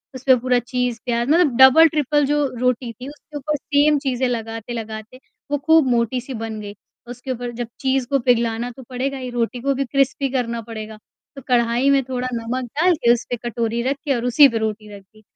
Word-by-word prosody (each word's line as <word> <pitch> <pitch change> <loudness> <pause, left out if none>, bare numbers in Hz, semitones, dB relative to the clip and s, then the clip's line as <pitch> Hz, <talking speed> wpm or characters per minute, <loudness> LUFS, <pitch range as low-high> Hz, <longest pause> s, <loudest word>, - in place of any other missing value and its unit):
उसपे 260 0 +4
पूरा 250 0 +1
चीज़, 245 -1 -2
प्याज़ 240 +1 -1
मतलब, 315 -6 +3
डबल-ट्रिपल 295 +1 +5
जो 295 0 +1
रोटी 250 -1 0
थी, 250 +5 -10
उसके 295 0 -11
ऊपर 300 +2 -2
सेम 290 +1 +2
चीज़ें 260 -2 -1
लगाते-लगाते 225 0 -6 0.3
वो 290 - +2
खूब 320 -4 +5
मोटी-सी 245 +2 -1
बन 225 -1 -5
गई। 205 0 -8 0.3
उसके 245 +2 -7
ऊपर 245 -1 -4
जब 240 - -3
चीज़ 265 -2 0
को 275 -1 +2
पिघलाना 235 -1 0
तो 260 +2 -13
पड़ेगा। 265 +2 -3
ये 255 -1 -5
रोटी 240 +1 -2
को 275 +1 +1
भी 275 +1 -2
क्रिस्पी 275 +1 0
करना 235 -3 -2
पड़ेगा। 220 -1 -8 0.4
तो 275 - -9
कढ़ाई 240 +2 +2
में 275 -1 +3
थोड़ा 255 0 -3
नमक 235 +2 -3
डाल 355 +1 +4
के, 240 -6 +2
उस 240 - -3
पे 245 - -1
कटोरी 235 0 -2
रख 275 +2 -1
के 275 -3 +1
और 235 +1 -3
उसी 280 +4 +7
पे 230 - -2
रोटी 215 -1 -4
रख 200 - -12
दी। 215 +3 -23
250 Hz, 205 wpm, -21 LUFS, 235-275 Hz, 0.4 s, उसी